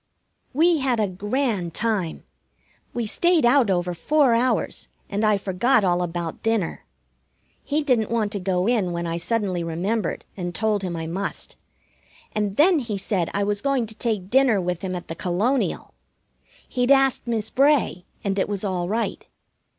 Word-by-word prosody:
We 325 +3 +3
had 260 -4 +1
a 210 - +2
grand 205 - -2
time. 210 -7 -1 0.7
We 240 -1 -2
stayed 340 +6 +2
out 245 -2 +4
over 180 -1 0
four 275 - +3
hours, 245 +2 0 0.2
and 205 +2 -1
I 215 -1 +4
forgot 200 +6 +2
all 180 -1 +2
about 170 -1 -4
dinner. 225 -6 -1 0.8
He 300 +1 0
didn't 245 -7 +2
want 220 -3 0
to 205 - -3
go 180 -1 0
in 210 -6 +1
when 170 0 -3
I 165 0 -2
suddenly 190 -2 -1
remembered 175 +5 -2
and 175 -2 -5
told 215 -2 +1
him 180 -3 -3
I 165 -1 -4
must, 190 +4 -4 0.8
and 205 -2 -1
then 335 +2 +5
he 230 -6 -3
said 190 -3 -1
I 200 - +1
was 205 0 0
going 275 -4 +1
to 220 0 -7
take 210 -5 -2
dinner 260 -5 +4
with 180 -1 -2
him 185 -2 -3
at 175 - -6
the - - -4
Colonial. 195 +11 -1 0.7
He'd 250 0 0
asked 270 -3 +4
Miss 220 -2 -1
Bray, 275 -9 +2 0.2
and 195 -1 -1
it 190 - 0
was 205 -1 -3
all 180 -3 -1
right. 220 -2 -2
205 Hz, 170 wpm, -23 LUFS, 180-240 Hz, 0.8 s, then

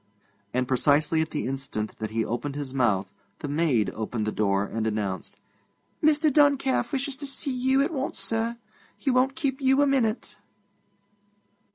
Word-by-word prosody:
And 125 +2 0
precisely 145 +5 +3
at 160 - -2
the 150 - -3
instant 130 -5 -4
that 110 -1 -3
he 110 0 -1
opened 135 +5 -3
his 140 -3 -4
mouth, 100 -7 +1 0.2
the - - -5
maid 145 -7 +1
opened 110 0 -3
the 110 - -1
door 100 -2 +1
and 110 +2 -2
announced: 100 -2 -3 0.7
'Mr. 305 -1 +4
Duncalf 280 -3 +3
wishes 275 -1 -1
to 285 - -5
see 275 +1 -2
you 260 +2 +2
at 325 +4 -2
once, 275 -1 -3
sir. 230 +1 -1 0.4
He 270 - 0
won't 255 +2 +2
keep 280 -4 -2
you 265 +1 +4
a 285 - +5
minute.' 255 -5 0
160 Hz, 165 wpm, -26 LUFS, -, 0.7 s, a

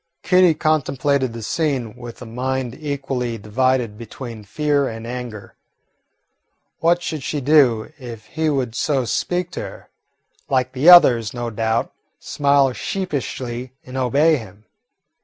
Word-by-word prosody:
Kitty 180 -3 +5
contemplated 140 -4 +1
the 115 -1 -7
scene 135 -5 -1
with 120 +1 -9
a - - -9
mind 125 +1 -3
equally 135 -5 -3
divided 115 +1 0
between 115 -1 -8
fear 145 +6 0
and 115 -1 -6
anger. 120 -3 -7 1.3
What 175 +1 +2
should 155 -4 -3
she 145 +3 -3
do 135 -3 +3
if 115 -4 -9
he 160 0 -2
should 135 -6 0
so 135 +1 0
speak 180 +8 -1
to - - -5
her? - - -9 0.6
Like 130 -1 +1
the 135 +6 +4
others, 125 -11 +7
no 120 -1 -3
doubt, 110 +1 -1 0.3
smile 140 -2 +2
sheepishly 130 - -4
and 130 - -10
obey 140 +5 +3
him. 105 -3 -12
130 Hz, 135 wpm, -21 LUFS, 115-145 Hz, 1.3 s, others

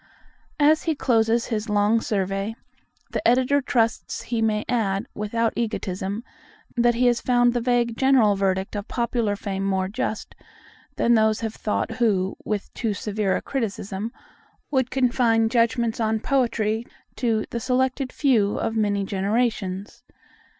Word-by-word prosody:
As 305 +2 +5
he 325 -2 +1
closes 230 -3 +2
his 220 -1 -3
long 210 +2 +3
survey, 195 +1 -2 0.6
the - - -2
Editor 255 +4 +3
trusts 240 -4 0
he 230 -2 -2
may 215 -1 +1
add, 210 -4 0
without 225 +2 -1
egotism, 200 -2 -3 0.5
that 240 -1 +3
he 250 +2 +2
has 240 -1 +3
found 245 -1 +3
the 240 - 0
vague 240 -1 +1
general 255 -6 +4
verdict 190 0 -1
of 205 0 -4
popular 235 -3 -1
fame 195 -1 -4
more 190 -1 0
just 215 +1 -4 0.6
than 235 - +3
those 220 -1 +3
have 220 -1 -3
thought 210 - -2
who, 195 -5 +1
with 210 -2 -3
too 220 -4 -2
severe 205 -1 -1
a - - -3
criticism, 210 -4 -3 0.6
would 260 -3 +1
confine 240 -3 +2
judgments 235 0 +1
on 220 -1 +1
poetry 225 -4 0 0.3
to 225 -3 0
"the 235 - -2
selected 260 +2 0
few 225 -8 +2
of 225 - -2
many 205 -2 +1
generations." 200 +1 -1
225 Hz, 145 wpm, -24 LUFS, 205-240 Hz, 0.6 s, As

